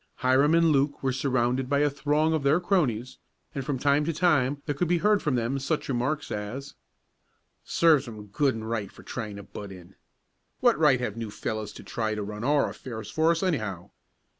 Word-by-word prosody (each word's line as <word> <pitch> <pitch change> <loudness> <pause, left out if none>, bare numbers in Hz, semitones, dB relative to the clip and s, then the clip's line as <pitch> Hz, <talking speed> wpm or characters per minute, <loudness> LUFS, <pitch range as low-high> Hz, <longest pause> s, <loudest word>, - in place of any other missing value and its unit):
Hiram 135 +5 +3
and 165 -1 +4
Luke 140 0 +1
were 130 -1 +1
surrounded 130 -1 0
by 140 0 +2
a 150 - +4
throng 150 +3 +1
of 160 - 0
their 140 +4 +3
cronies, 135 - 0 0.3
and 140 -3 -3
from 135 +1 -2
time 140 +2 +2
to 165 - 0
time 145 -5 +2
there 145 - -1
could 170 +5 -1
be 175 +1 +2
heard 210 +3 +3
from 150 -4 0
them 120 +3 -1
such 150 +3 -2
remarks 135 +4 -1
as: 115 +7 -5 0.9
"Serves 155 -5 +3
'em 110 -2 -8
good 130 +6 0
and 110 0 -6
right 110 -4 -3
for - - -15
trying 110 -4 -5
to 100 - -8
butt 100 0 -9
in." 90 0 -12 0.7
"What - - +3
right 145 -5 +5
have 115 -4 -3
new 115 -2 -4
fellows 110 0 -4
to - - -11
try 110 -2 -2
to 105 - -3
run 105 +2 -6
our 145 +2 +3
affairs 110 -5 -7
for 160 +1 +2
us, 170 +2 +1
anyhow?" 110 - -2
135 Hz, 205 wpm, -27 LUFS, 110-150 Hz, 0.9 s, right